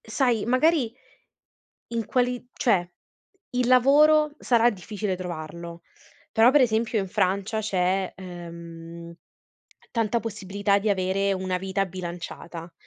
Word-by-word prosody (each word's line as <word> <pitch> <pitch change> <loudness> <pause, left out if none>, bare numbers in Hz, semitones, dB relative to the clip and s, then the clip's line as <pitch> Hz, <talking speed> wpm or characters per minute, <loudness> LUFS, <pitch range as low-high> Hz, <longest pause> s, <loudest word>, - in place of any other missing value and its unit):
sai 235 -1 0
magari 255 0 +3 1.0
in 230 -2 -2
quali 250 -1 0
cioè 185 -7 +2 0.6
il 250 -1 0
lavoro 295 +4 +5
sarà 235 -1 +4
difficile 205 0 -4
trovarlo, 170 -1 -7 0.5
però 225 +2 +6
per 295 - +5
esempio 225 -2 +1
in 195 - -2
Francia 200 +4 0
c'è, 190 -2 0
ehm, 170 -2 -9 0.8
tanta 230 0 +1
possibilità 200 -2 -1
di 210 +1 0
avere 195 +1 +1
una 185 -1 -2
vita 195 +1 -1
bilanciata, 175 -1 -7
200 Hz, 110 wpm, -25 LUFS, 180-235 Hz, 1.0 s, però